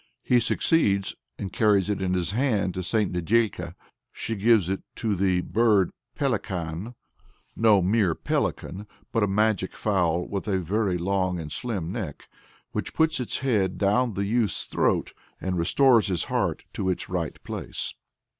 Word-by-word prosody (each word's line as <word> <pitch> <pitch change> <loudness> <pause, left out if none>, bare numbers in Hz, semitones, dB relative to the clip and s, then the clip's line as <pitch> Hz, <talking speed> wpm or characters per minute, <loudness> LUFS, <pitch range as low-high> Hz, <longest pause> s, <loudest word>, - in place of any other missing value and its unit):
He 125 - +4
succeeds, 100 -6 +1 0.2
and 95 -2 -5
carries 105 -4 +3
it 105 -2 -1
in 95 -1 0
his 90 -1 -1
hand 110 -6 +1
to 95 - -3
St. 105 +3 0
Nedĕlka. 100 +5 0 0.4
She 115 - -4
gives 105 -2 +4
it 95 +1 -2
to 110 -4 -1
"the 90 -1 +2
bird 105 -3 +3 0.3
Pelekan 90 +6 -2 0.6
(no 110 -4 +4
mere 95 -3 +2
Pelican, 100 +4 -2 0.2
but 115 - +1
a 105 - +3
magic 105 -1 +1
fowl 90 -5 +1
with 100 +1 -4
a 100 -2 +1
very 95 +1 0
long 95 0 0
and 75 -2 -6
slim 95 -8 -3
neck), 95 - -6 0.4
which - - -4
puts 160 -1 +2
its 125 - -3
head 105 -9 +1
down 105 +3 +2
the 100 - -1
youth's 110 -3 +1
throat, - - 0 0.3
and 95 -1 -2
restores 115 +5 +4
his 90 -3 0
heart - - -1
to 95 - -1
its 90 - -2
right 90 -4 -3
place." - - -4
100 Hz, 155 wpm, -26 LUFS, 90-110 Hz, 0.6 s, He